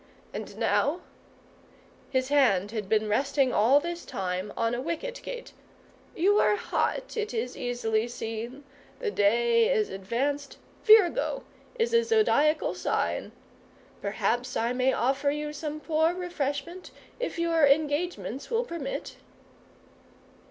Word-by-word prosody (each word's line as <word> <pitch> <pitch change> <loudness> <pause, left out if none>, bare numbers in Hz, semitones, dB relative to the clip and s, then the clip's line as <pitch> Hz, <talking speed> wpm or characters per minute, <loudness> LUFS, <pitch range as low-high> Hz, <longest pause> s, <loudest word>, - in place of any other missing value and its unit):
And - - -7
now 310 +6 +1 0.5
" - - -28 0.3
his 260 0 0
hand 210 -9 +3
had 215 -4 -4
been 215 0 +2
resting 270 +4 +1
all 250 +7 +5
this 345 +2 -5
time 185 +1 -3
on 230 0 +1
a 240 - -2
wicket 480 - -4
gate - - -7 0.6
"you 405 +5 +3
are - - +4
hot, 465 +2 -2
it 430 - -3
is 245 +2 -2
easily 235 -2 -1
seen; 235 +3 -6 0.3
the 470 -4 -2
day 230 - +3
is 215 -1 +1
advanced, 260 +9 -2 0.3
Virgo 440 +3 +5 0.3
is 460 0 +1
the 465 0 +4
Zodiacal 430 -10 +3
sign. - - -1 0.7
Perhaps 240 +5 -1
I 235 +2 0
may 255 +1 +2
offer 270 +4 +1
you 300 +1 -3
some 300 0 -5
poor 320 +2 +1
refreshment, 345 -1 -4 0.3
if - - -3
your 330 -3 +3
engagements 290 - 0
will 470 0 +1
permit." 325 - -5
280 Hz, 130 wpm, -28 LUFS, 235-340 Hz, 0.7 s, all